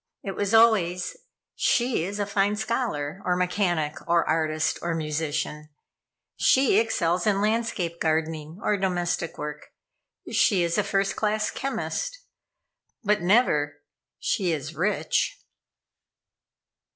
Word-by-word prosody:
It 195 - -3
was 205 0 -1
always: 205 -6 +4 0.4
"She 240 -8 +1
is 200 +2 -4
a 205 - 0
fine 200 +1 +1
scholar, 210 - -2
or 180 - +1
mechanic, 180 -4 0
or 170 0 +3
artist, 155 -1 0
or 170 -1 -1
musician. 150 -1 -3 0.7
She 260 -6 +4
excels 180 -5 0
in 200 -2 +3
landscape 210 -6 -1
gardening, 160 0 -1
or 210 - +2
domestic 175 -3 -1
work. 150 0 -6 0.6
She 190 -6 +3
is 170 +4 0
a - - +2
first 195 0 0
class 215 0 0
chemist." - - -3 0.9
But 210 -1 +2
never 160 -7 +2 0.4
"She 185 -3 0
is 155 0 -3
rich." 210 - 0
180 Hz, 115 wpm, -26 LUFS, 160-210 Hz, 0.9 s, always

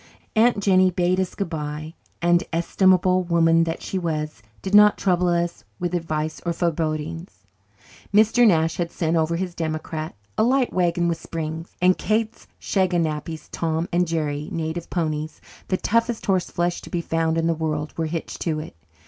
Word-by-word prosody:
Aunt 230 0 +4
Jennie 185 -2 +4
bade 180 +1 +1
us 190 -2 -2
goodbye 155 -4 -4 0.3
and, 175 0 +4
estimable 185 +2 +3
woman 165 -1 +3
that 165 0 -4
she 190 - -2
was, 155 -5 -3 0.2
did 190 - -4
not 210 0 +7
trouble 180 -2 +1
us 175 0 0
with 175 0 -3
advice 155 -2 -2
or 170 - -1
forebodings. 165 0 -3 0.7
Mr. 220 +3 +5
Nash 165 -4 +2
had 170 -1 -1
sent 165 -1 -1
over 165 +1 +1
his 180 0 -3
"democrat," 155 -2 -4 0.2
a - - +5
light 255 +1 +2
wagon 175 -1 +1
with 165 -1 -1
springs; 160 0 -5
and 185 0 +4
Kate's 220 +1 -1
"shaganappies," 165 -4 -1
Tom 165 0 -1
and 175 0 +2
Jerry 150 -2 -2
native 165 +1 -3
ponies, 155 -3 -2 0.3
the 185 - 0
toughest 230 +3 0
horse 185 -3 +1
flesh 175 0 -1
to - - -11
be 175 - -1
found 165 -1 0
in 165 - +1
the 165 - +2
world 155 -1 -3
were 165 -1 -1
hitched 165 +1 -5
to 155 -3 -1
it. 155 - -8
170 Hz, 165 wpm, -23 LUFS, 160-185 Hz, 0.7 s, not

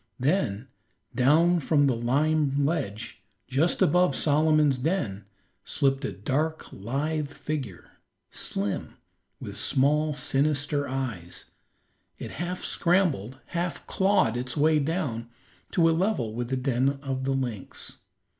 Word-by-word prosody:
Then 130 - 0 0.5
down 165 +7 +4
from 145 -1 +3
the 130 -3 +2
lime 140 +3 +1
ledge, 115 - -3 0.3
just 145 +7 +2
above 180 -2 +3
Solomon's 150 -2 +3
den, 125 - -1 0.4
slipped 135 0 0
a - - -2
dark, 150 +10 -2
lithe 145 +8 -2
figure, 145 - -6 0.4
slim, 100 0 -4 0.4
with - - -7
small, 150 +3 +2
sinister 145 0 0
eyes; 120 -10 -5 0.7
it - - -7
half 180 +1 -3
scrambled, 165 - +1 0.2
half 175 0 -2
clawed 190 - +2
its 125 +3 -4
way 155 +1 +4
down 140 -7 -2 0.4
to 165 -2 +3
a - - +4
level 160 - 0
with 120 +1 -3
the 130 - 0
den 130 +1 +1
of 135 -1 -3
the 135 - +1
lynx. 120 -7 -5
140 Hz, 120 wpm, -27 LUFS, 125-155 Hz, 0.7 s, down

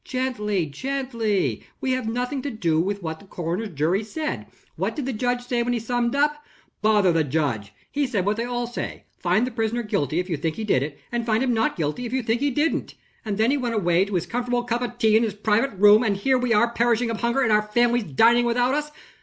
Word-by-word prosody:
"Gently! 210 -8 -1
gently! 220 - -2 0.2
we 265 - -1
have 255 -3 -1
nothing 250 +4 -2
to 285 - -3
do 170 - 0
with 200 +2 -3
what 160 -1 -4
the 200 - -17
coroner's 180 +5 -3
jury 170 +5 0
said. 305 +9 -4 0.3
What - - -2
did 290 - -3
the 265 - -2
judge 245 +2 -1
say 245 -1 0
when 245 +1 0
he 240 - 0
summed 240 +2 -1
up?" 295 +1 +1 0.4
"Bother 210 -3 +4
the 165 -1 +2
judge! 130 -9 -1 0.2
He 285 -1 0
said 205 -7 -1
what 205 +1 +1
they 230 - -1
all 245 0 -2
say: 240 +1 -6 0.2
'Find 220 - +2
the 255 - -4
prisoner 230 +1 -1
guilty, 155 - -1
if 180 - -2
you 165 -5 -2
think 160 +1 -2
he 220 - -4
did 195 -12 +2
it; 140 0 -5
and 240 0 -1
find 225 +1 +1
him 250 -2 +1
not 225 -1 +1
guilty, 160 +10 -2
if 235 - -7
you 260 -1 0
think 225 +2 0
he 285 - +2
didn't.' 295 +5 -1 0.3
And 210 -3 -3
then 220 +4 +3
he 290 - +2
went 240 -4 -2
away 175 -2 +2
to 200 -1 -4
his 175 - 0
comfortable 245 0 -1
cup 240 0 -1
of 240 -1 -4
tea 220 -2 +3
in 220 - +5
his 220 -3 -1
private 215 +3 +1
room. 210 +2 +7
And 210 -5 +1
here 260 +6 +2
are - - -1
we 250 -1 -1 0.2
perishing 235 0 +2
of 225 - -4
hunger, 235 +3 +1
and 235 -4 +2
our 210 0 +5
families 240 +2 +1
dining 230 - +4
without 245 +2 +2
us." 300 +1 -1
225 Hz, 245 wpm, -24 LUFS, 200-245 Hz, 0.4 s, room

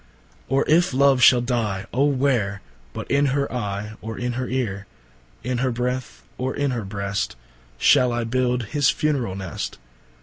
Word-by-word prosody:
Or 135 +2 +2
if 165 -3 +3
Love 135 -1 +4
shall 125 -1 +7
dye, 110 -5 -1
ô 140 +4 +3
where, 125 -8 0 0.3
But - - -6
in 140 +1 +3
her 140 -2 -1
Eye, 105 -2 -3
or 110 0 -6
in 120 0 -2
her 125 +1 -3
Eare, 105 -7 -2 0.6
In 125 0 -1
her 130 0 +1
Breath, 125 +1 -3 0.2
or 130 +1 -2
in 145 -1 0
her 120 -3 -2
Breast, 100 +1 -3 0.4
Shall 125 - +4
I 120 0 -1
Build 125 +1 0
his 145 -3 +3
funerall 135 - 0
Nest? 95 -6 -5
125 Hz, 165 wpm, -23 LUFS, 105-130 Hz, 0.6 s, shall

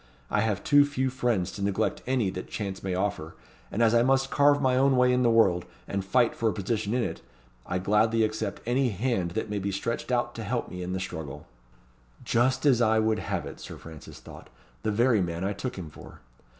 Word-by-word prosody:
I 105 - +2
have 105 -3 -1
too 145 0 +6
few 130 -2 -1
friends 120 -8 0
to 100 - -8
neglect 100 +2 0
any 125 -7 +1
that 90 - -6
chance 100 -3 -4
may 95 -1 -2
offer; 90 -4 -2 0.4
and 115 - +1
as 115 0 +4
I 115 - +5
must 135 +2 +2
carve 145 0 +4
my 130 -2 +2
own 135 0 +3
way 125 0 +4
in 125 - +2
the 120 - +4
world, 95 -7 +4 0.2
and 100 -1 -2
fight 120 +5 +2
for 115 - +1
a - - -2
position 105 +2 -2
in 125 - +1
it, - - -4 0.5
I 90 - -1
gladly 110 +4 +2
accept 110 0 -3
any 125 +2 +1
hand 105 -3 -1
that 110 - -2
may 105 - -1
be 100 +1 -2
stretched 115 +6 -3
out 120 -1 0
to 115 - -6
help 115 +3 -2
me 90 - -6
in 90 +1 -4
the 95 - -2
struggle." 80 -7 -6 0.8
"Just 125 +4 +1
as 130 -4 +4
I 110 -1 +3
would 110 0 +2
have - - -3
it," - - -9
Sir - - -9
Francis 80 -2 -11
thought, - - -13 0.3
"The - - -1
very 115 0 +3
man 85 0 -3
I 100 +2 -1
took 125 +2 -5
him 85 -5 -7
for. - - -13
110 Hz, 225 wpm, -27 LUFS, 95-125 Hz, 0.8 s, too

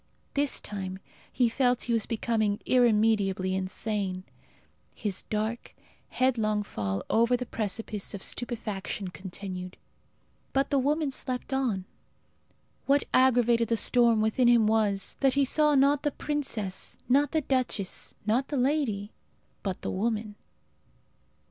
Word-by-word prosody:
This 285 0 +1
time 190 -2 -5 0.3
he 250 -2 +2
felt 245 +1 +1
he 235 - -1
was 225 -2 0
becoming 220 -2 0
irremediably 210 -6 +3
insane. 190 0 -2 0.7
His 200 -3 -2
dark, 220 +2 -3 0.3
headlong 220 -5 +1
fall 100 - -3
over 235 +2 +3
the 250 - -4
precipice 215 -2 -3
of 195 - -6
stupefaction 210 -5 -3
continued. 185 0 -7 0.8
But 275 +1 +1
the 280 - +3
woman 295 +2 +1
slept 255 0 -3
on. 235 -9 0 1.0
What 280 +1 +4
aggravated 240 -2 +4
the 230 - +1
storm 235 -1 +4
within 220 +3 +2
him 235 -2 +5
was, 210 -3 +1
that 270 -1 +3
he 280 -1 +4
saw 300 +2 +3
not 280 +1 +4
the 295 - +1
princess, 265 -10 -3
not 280 +3 +3
the 315 - +1
duchess, 255 -8 -2
not 235 +5 +1
the 290 - -2
lady, 250 -7 0 0.5
but 190 -2 -4
the - - -2
woman. 215 +1 -1
230 Hz, 130 wpm, -28 LUFS, 205-260 Hz, 1.0 s, him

